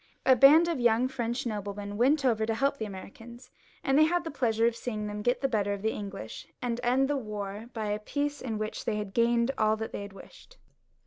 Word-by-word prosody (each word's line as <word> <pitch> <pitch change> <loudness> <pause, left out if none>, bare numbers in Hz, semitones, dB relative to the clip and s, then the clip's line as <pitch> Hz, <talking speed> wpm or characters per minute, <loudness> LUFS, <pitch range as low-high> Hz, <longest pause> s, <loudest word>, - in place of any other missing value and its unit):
A 260 - +7
band 295 +7 +7
of 335 -5 -1
young 240 +1 +3
French 245 0 -3
noblemen 205 -2 -4
went 270 +6 +3
over 225 -4 +2
to 225 - 0
help 275 +3 +1
the 220 - -3
Americans, 225 +5 -11 0.3
and 270 +2 +3
had 340 +2 +3
the 325 - -5
pleasure 230 -5 +1
of 235 0 +2
seeing 215 -3 -4
them 210 0 -4
get 245 +4 +1
the 270 - +2
better 205 -5 0
of 200 0 -6
the 220 - +1
English 195 - -7
and 240 -1 -2
end 255 +2 +2
the 290 - 0
war, 210 -6 -4
as - - -7
I - - -7
have - - -9
said, 245 - -25
by 220 -2 -3
a 210 +1 -1
peace, 290 +6 -3
in 225 -4 -3
which 215 0 -4
they 210 -1 -1
gained 235 +4 +2
all 215 0 +3
that 220 0 -5
they - - -5
had 200 -1 -8
wished. - - -15
230 Hz, 245 wpm, -29 LUFS, 210-265 Hz, 0.3 s, A